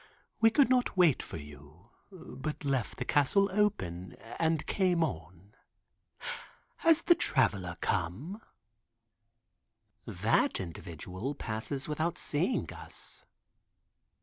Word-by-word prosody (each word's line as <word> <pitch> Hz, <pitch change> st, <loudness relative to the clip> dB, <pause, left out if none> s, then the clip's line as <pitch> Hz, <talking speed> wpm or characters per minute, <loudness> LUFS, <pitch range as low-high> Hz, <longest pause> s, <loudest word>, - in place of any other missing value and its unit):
We 225 Hz, -, +7 dB
could 275 Hz, +4 st, +5 dB
not 250 Hz, -5 st, +2 dB
wait 170 Hz, -7 st, +5 dB
for -, -, -7 dB
you, 75 Hz, +7 st, -13 dB, 0.2 s
but 155 Hz, -5 st, -6 dB
left 135 Hz, -5 st, -1 dB
the -, -, -3 dB
castle 195 Hz, +8 st, +3 dB
open 95 Hz, -, 0 dB, 0.3 s
and 160 Hz, -2 st, +1 dB
came 180 Hz, -4 st, +2 dB
on. 90 Hz, -, -6 dB, 1.2 s
Has 330 Hz, 0 st, +4 dB
the 345 Hz, -, +7 dB
Traveler 95 Hz, -, +1 dB
come?" 130 Hz, -, -2 dB, 1.7 s
That -, -, +2 dB
individual 90 Hz, -, -5 dB
passes 125 Hz, +4 st, -4 dB
without 160 Hz, +2 st, -1 dB
seeing 170 Hz, -, 0 dB
us. -, -, -7 dB
140 Hz, 100 wpm, -31 LUFS, -, 1.7 s, We